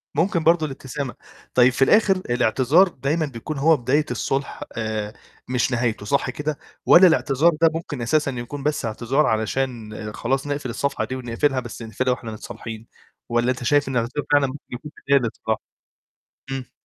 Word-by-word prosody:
ممكن 170 +1 +1
برضه 165 -1 +4
الابتسامة. 135 -1 -5 0.4
طيّب 125 0 +6
في 135 - -5
الآخر 205 +3 +5
الاعتذار 130 - +4
دايمًا 155 +1 -1
بيكون 140 +3 -6
هو 155 +2 +4
بداية 140 +5 +1
الصُلح 135 +3 -2
آآ 110 -1 -3 0.3
مش 125 +1 0
نهايته، 115 -3 -1
صح 140 +2 +1
كده؟ 150 +2 -3 0.3
والّا 185 +2 +8
الاعتذار 160 0 +3
ده 165 - +7
ممكن 155 -6 -5
أساسًا 140 +3 +1
يكون 125 +3 -6
بس 150 -5 0
اعتذار 120 +7 +1
علشان 110 0 -1 0.2
خلاص 135 +4 -1
نقفِل 145 -3 -3
الصفحة 140 +4 -1
دي، 130 - -5
ونقفِلها 130 +2 0
بس 120 -1 -8
نقفِلها 125 +3 -1
وإحنا 115 -3 -7
متصالحين، 110 +1 -8 0.4
والّا 120 +2 +2
أنت 125 -1 -5
شايف 145 +2 +3
الاعتذار 125 +2 -1
فعلًا 145 -2 +5
ممكن 140 +2 -8
يكون 125 +5 -7 0.2
بداية 140 0 +5
للصلاح؟ 110 -2 -2 0.9
إمم. 135 -2 -5
130 Hz, 160 wpm, -23 LUFS, 120-145 Hz, 0.9 s, والّا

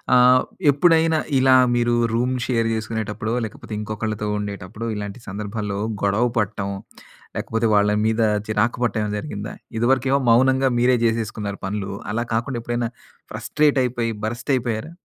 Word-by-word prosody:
ఆహ్, 125 +1 +6 0.3
ఎప్పుడైనా 160 +1 +4 0.2
ఇలా 130 0 +5 0.2
మీరు 120 0 +2 0.2
రూమ్ 125 +2 +1
షేర్ 115 -3 +1
చేసుకునేటప్పుడో 110 0 -3
లేకపోతే 110 +1 -9
ఇంకొకళ్ళతో 105 0 -3
ఉండేటప్పుడు 100 +2 -6
ఇలాంటి 105 +3 -6
సందర్భాల్లో 100 +1 -4 0.2
గొడవ 100 +4 +2
పడటం 105 -2 -1 0.7
లేకపోతే 115 0 -1
వాళ్ళ 105 0 +4
మీద 110 +1 +1 0.3
చిరాకు 110 +2 +1
పడటం 115 -2 +1
ఏమైనా 105 0 -2
జరిగిందా? 105 -6 -6 0.2
ఇదివరకేమో 130 +3 +2
మౌనంగా 130 +3 +4
మీరే 125 +1 +4
చేసేసుకున్నారు 110 -3 -2
పనులు. 100 0 -3 0.2
అలా 115 +3 -1
కాకుండా 120 +3 -1
ఎప్పుడైనా 120 0 -2 0.4
ఫ్రస్ట్రేట్ 150 -2 +1
అయిపోయి 120 -2 -1
బరస్ట్ 120 +5 -5
అయిపోయారా? 120 +4 -3
115 Hz, 130 wpm, -22 LUFS, 105-125 Hz, 0.7 s, ఆహ్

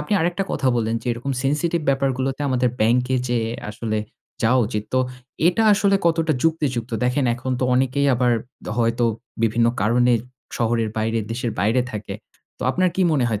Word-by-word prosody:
আপনি 150 - -4
আরেকটা 175 +3 0
কথা 135 - +1
বললেন, 115 -1 0
যে - - -12
এরকম 120 +4 -4
সেনসিটিভ 150 +5 0
ব্যাপারগুলোতে 135 0 0
আমাদের 125 -1 +2
ব্যাংকে 125 +4 +2
যেয়ে 115 -2 0 0.2
আসলে 110 0 -3 0.4
যাওয়া 120 +3 +4
উচিৎ। 105 -2 -3
তো - - +4 0.5
এটা 180 +5 +2
আসলে 200 -1 +3
কতটা 165 -1 +2
যুক্তিযুক্ত? 145 -8 0
দেখেন 125 +3 +1
এখন 130 +2 -5
তো - - +2
অনেকেই 135 +2 +1
আবার 125 0 +2 0.5
হয়তো 115 +1 +2 0.4
বিভিন্ন 115 +1 +3
কারণে 120 +4 +3 0.4
শহরের 115 -1 +1
বাইরে, 110 +1 0
দেশের 120 0 -2
বাইরে 110 +5 +2
থাকে। 105 -2 -6 0.4
তো - - -6
আপনার 185 +6 +2
কি 190 - +2
মনে 140 -5 +2
হয় 110 -3 -1
125 Hz, 165 wpm, -22 LUFS, 115-140 Hz, 0.5 s, যাওয়া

